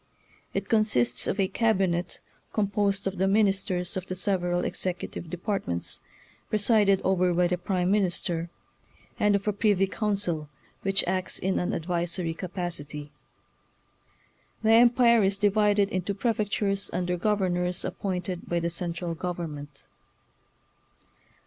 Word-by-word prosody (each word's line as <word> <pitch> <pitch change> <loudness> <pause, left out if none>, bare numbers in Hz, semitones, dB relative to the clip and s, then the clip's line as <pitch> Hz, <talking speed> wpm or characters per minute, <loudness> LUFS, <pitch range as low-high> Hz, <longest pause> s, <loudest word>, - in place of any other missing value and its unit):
It - - -2
consists 170 - +2
of 200 - -1
a 195 - +3
cabinet, 185 -6 0 0.3
composed 200 -1 0
of 195 -1 -3
the 190 - +3
ministers 195 -3 +1
of 185 0 -4
the 185 - -4
several 180 -2 0
executive 180 -2 -4
depart 185 +4 -3
ments, 85 0 -3 0.5
presided 210 -2 +3
over 185 -1 +2
by 180 +1 +3
the 180 0 0
Prime 180 -1 0
Min 205 -1 +4
ister; 170 -1 -2 0.7
and 205 -1 +4
of 200 +1 -2
a 210 - +2
privy 205 -2 +2
council, 195 -7 -2 0.3
which 195 0 +2
acts 185 +1 -2
in 190 0 0
an 180 - -1
advisory 170 0 -2
capacity. 165 -5 -5 1.5
The 220 - +4
Empire 235 0 +6
is 195 0 +2
divided 205 0 +3
into 185 0 -2
prefectures 205 -2 0
under 180 0 -1
governors 180 -2 0
appointed 180 -2 -4
by 175 - +1
the 170 0 -1
central 170 0 -3
government. 155 -5 -6
185 Hz, 130 wpm, -27 LUFS, 175-205 Hz, 1.5 s, Empire